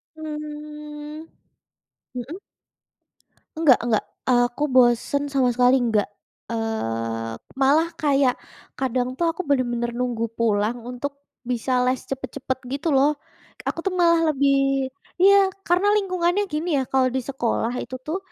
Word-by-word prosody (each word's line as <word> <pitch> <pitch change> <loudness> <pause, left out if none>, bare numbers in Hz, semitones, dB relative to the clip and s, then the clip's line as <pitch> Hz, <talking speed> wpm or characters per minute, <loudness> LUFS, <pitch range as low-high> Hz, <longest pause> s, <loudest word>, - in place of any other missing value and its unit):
Mmm. 300 0 -7 0.9
Mhm. 280 +10 -6 1.2
Enggak 310 -6 +6
enggak. 225 -3 +1 0.2
Aku 245 +3 +2
bosen 255 +3 +3
sama 265 -3 +2
sekali 250 +2 +4
enggak. 225 -5 +1 0.4
Eee, 115 - -2 0.3
malah 300 +5 +4
kayak 275 -4 +3 0.5
kadang 255 -1 0
tuh 340 - +1
aku 330 +3 -3
bener-bener 240 -3 +1
nunggu 240 -2 -1
pulang 220 0 +1
untuk 280 +3 -5 0.3
bisa 245 +1 -1 0.2
les 255 0 0
cepet-cepet, 260 0 -4
gitu 280 +4 -3
loh. 280 +3 +4 0.5
Aku - - -2
tuh 385 - 0
malah 335 -3 +4
lebih 275 -1 +2 0.3
iya, 395 +1 +7 0.2
karena 360 +4 +3
lingkungannya 370 -1 +1
gini 310 +3 -2
ya, - - -1
kalau 265 -1 +3
di 260 - +1
sekolah 240 -3 -1
itu 255 - -7
tuh, 315 +4 -2
270 Hz, 125 wpm, -23 LUFS, 245-300 Hz, 1.2 s, iya